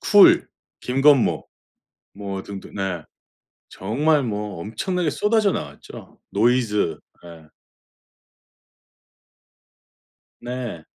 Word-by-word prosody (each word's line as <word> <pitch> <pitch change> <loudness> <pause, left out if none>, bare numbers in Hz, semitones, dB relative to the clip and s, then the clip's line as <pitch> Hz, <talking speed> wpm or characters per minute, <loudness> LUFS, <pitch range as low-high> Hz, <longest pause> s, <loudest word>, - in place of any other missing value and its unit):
쿨, 205 -2 +6 0.3
김건모 135 +1 +3 0.7
뭐 100 -1 -5
등등 100 -1 -9
네. 95 -4 -3 0.7
정말 145 +10 +1
뭐 105 -5 -4
엄청나게 155 - -2
쏟아져 210 +3 +2
나왔죠. 70 0 -8
노이즈 105 -7 +1 0.3
예. 80 -2 -13 2.9
네. 120 -8 -5
110 Hz, 140 characters per minute, -22 LUFS, 95-140 Hz, 2.9 s, 쿨